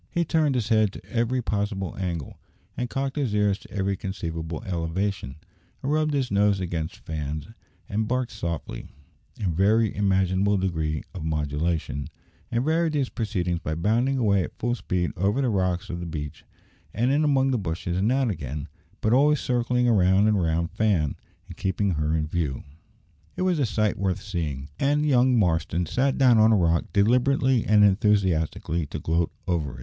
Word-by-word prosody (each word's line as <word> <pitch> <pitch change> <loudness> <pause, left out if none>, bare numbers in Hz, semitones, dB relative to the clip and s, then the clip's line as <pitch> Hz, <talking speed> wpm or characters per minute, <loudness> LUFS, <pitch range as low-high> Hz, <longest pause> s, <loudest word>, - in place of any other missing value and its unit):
He 170 0 0
turned 155 -4 +2
his 120 -3 -1
head 110 -3 +3
to - - -11
every 120 +2 0
possible 100 -4 -2
angle, 85 -6 -4 0.4
and 125 -1 -3
cocked 135 +3 -3
his 130 -8 0
ears 105 -1 +2
to - - -16
every 100 0 -1
conceivable 80 -4 -5
elevation, 90 -3 -2 0.5
and 135 - -1
rubbed 155 -1 +1
his 130 -5 -1
nose 100 0 +3
against 85 -3 -3
Fan's, 75 +1 -4 0.4
and 110 +1 -1
barked 125 0 -1
softly, 85 - -5 0.5
in 95 -4 0
every 110 +2 +3
imaginable 95 0 +2
degree 80 -5 -1
of 90 - -6
modulation, 75 -1 -2 0.4
and 120 +3 0
varied 160 0 +1
these 140 -4 0
proceedings 90 -6 -2
by 80 0 -3
bounding 115 +10 +1
away 100 -6 +3
at - - -8
full 120 +1 -1
speed 90 -7 -1
over 100 +8 +1
the 130 -3 +1
rocks 90 -4 0
of 85 - -5
the 85 - -5
beach, 75 -3 -6 0.5
and 120 +6 +2
in 145 +2 +2
among 135 -2 +3
the 125 - +1
bushes 85 -1 -3
and 100 +6 +1
out 130 -3 +2
again, 70 -4 -5 0.3
but 110 - +2
always 145 +2 +4
circling 125 0 +1
round 100 -2 +4
and 105 -3 +2
round 85 +1 0
Fan, 95 -10 +1 0.3
and - - -11
keeping 95 +1 0
her 75 -1 0
in 80 -1 0
view! 75 -4 -2 0.7
It - - -2
was 180 -4 +1
a 135 - +2
sight 105 0 0
worth 95 0 0
seeing, 80 -9 -4
and 145 +2 +2
young 130 -3 +4
Marston 85 -3 +1
sat 130 - 0
down 125 -4 +5
on 110 +1 +6
a - - +5
rock, 85 -2 +2
deliberately 125 +4 +3
and 105 0 +5
enthusiastically, 95 -6 +1
to - - -5
gloat 80 +1 0 0.2
over 75 -7 -1
it. - - -11
100 Hz, 175 wpm, -25 LUFS, 85-120 Hz, 0.7 s, on